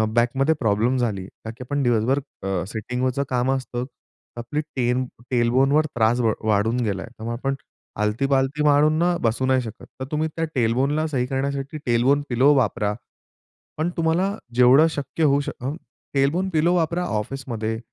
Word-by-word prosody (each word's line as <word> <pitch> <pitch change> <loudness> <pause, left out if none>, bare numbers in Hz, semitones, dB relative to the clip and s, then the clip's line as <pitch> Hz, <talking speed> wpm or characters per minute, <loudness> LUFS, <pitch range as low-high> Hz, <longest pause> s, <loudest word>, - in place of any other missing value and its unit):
बॅकमध्ये 135 +6 +2
problem 115 +3 +1
झाली 105 -7 -1
कारण 110 +2 -10
की - - -7
आपण 145 +1 -1
दिवसभर 120 +2 +2 0.3
अ, 95 -3 -1
सिटिंग 120 +4 -4
वरचं 130 +2 0
काम 125 +1 +1
असतं 125 -2 -3 0.5
आपली 120 +6 -2
टेल 125 -1 +1 0.3
टेल 120 -2 +2
बोन 135 +2 +3
वर 155 +2 +4
त्रास 115 +1 +2 0.2
वाढून 110 +2 +2
गेला. 95 -3 -2
त्यामुळे 115 -1 -6
आपण 135 +2 -1
ना 135 -5 -11
आलती-पालती 135 +6 +1
मारून 150 +1 +4
ना 175 +1 +2
बसू 115 +3 +1
नाही 130 0 +3
शकत 115 -4 -9
तर 130 - -3
तुम्ही 155 +1 0
त्या 165 - 0
टेल 115 -3 +2
बोनला 145 +5 +1
सही 130 -5 -1
करण्यासाठी 140 +2 -3
टेल 120 -1 +2
बोन 140 +3 +3
पिलो 130 +4 +4
वापरा. 105 -5 +1 0.8
पण 160 +3 0
तुम्हाला 165 +3 +1 0.3
जेवढं 125 +5 +6
शक्य 145 +1 -2
होऊ 140 -1 +4
शकतं 135 -1 -4
अ, - - -8 0.4
टेल 135 0 +3
बोन 185 +5 -1
पिलो 170 +1 +2
वापरा 170 +1 0
ऑफिसमध्ये. 110 -2 -4
130 Hz, 175 wpm, -23 LUFS, 120-145 Hz, 0.8 s, जेवढं